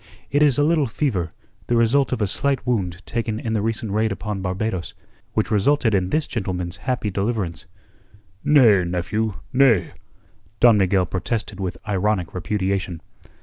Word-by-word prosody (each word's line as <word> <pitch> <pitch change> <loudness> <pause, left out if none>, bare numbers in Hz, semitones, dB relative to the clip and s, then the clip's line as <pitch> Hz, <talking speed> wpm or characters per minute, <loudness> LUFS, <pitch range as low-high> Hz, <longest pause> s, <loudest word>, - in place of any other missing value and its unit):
It 145 - +2
is 145 -4 +4
a 145 - +3
little 155 -2 +2
fever, 105 - -1 0.4
the 120 - +1
result 120 +4 +3
of 125 -4 0
a - - +3
slight 135 +4 -1
wound 95 -7 -2
taken 115 -2 -2
in 110 -1 -3
the 110 - +1
recent 110 -1 -2
raid 110 +2 +1
upon 105 0 -4
Barbados, 95 0 -3 0.4
which 110 0 0
resulted 110 +3 +2
in 95 -2 +1
this 155 +5 +1
gentleman's 95 -5 -3
happy 120 -5 -1
deliverance." 100 -3 -2 0.8
"Nay, 115 -11 +5
nephew, 90 +5 -2 0.2
nay," 125 -9 +4 0.7
Don 115 -3 +6
Miguel 95 -1 +3
protested 105 +3 -3
with 95 -2 -3
ironic 100 -3 0
repudiation. 95 -1 -2
105 Hz, 150 wpm, -22 LUFS, 95-120 Hz, 0.8 s, Don